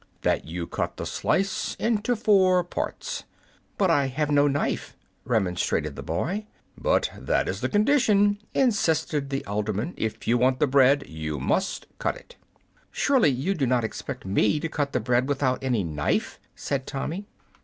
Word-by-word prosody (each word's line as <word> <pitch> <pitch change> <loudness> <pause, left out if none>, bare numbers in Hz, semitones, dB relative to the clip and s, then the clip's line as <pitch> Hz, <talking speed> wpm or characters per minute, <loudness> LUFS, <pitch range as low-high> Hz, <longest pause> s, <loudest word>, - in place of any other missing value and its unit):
"That - - +1
you 85 +1 -4
cut - - -3
the - - -4
slice 195 +1 -1
into 230 +1 0
four 190 -5 +4
parts." 175 - -4 0.5
"But 190 -4 +3
I 140 -4 +3
have 150 +3 -1
no 145 0 +5
knife!" 140 0 -2 0.3
remonstrated 95 -8 0
the - - -6
boy. 185 - -2 0.3
"But - - +1
that - - 0
is - - -3
the - - 0
condition," 210 -3 +3 0.2
insisted 160 - +1
the 135 0 -3
alderman. 105 - -2
"If 110 -1 -4
you 120 +1 +3
want 130 +1 +2
the - - +4
bread 140 +1 +4
you 80 -2 -4
must 190 - -1
cut - - 0
it." - - -15 0.5
"Surely 265 - +3
you 140 +9 0
do 140 -8 0
not 125 -1 +2
expect 125 +3 -5
me 100 +7 +2
to 165 - -2
cut 145 -3 -2
the - - 0
bread 125 +3 +1
without 135 -2 0
any 125 -6 +1
knife!" 75 -4 -1 0.2
said 135 -2 -3
Tommy. 170 +9 -4
140 Hz, 165 wpm, -26 LUFS, 120-190 Hz, 0.5 s, no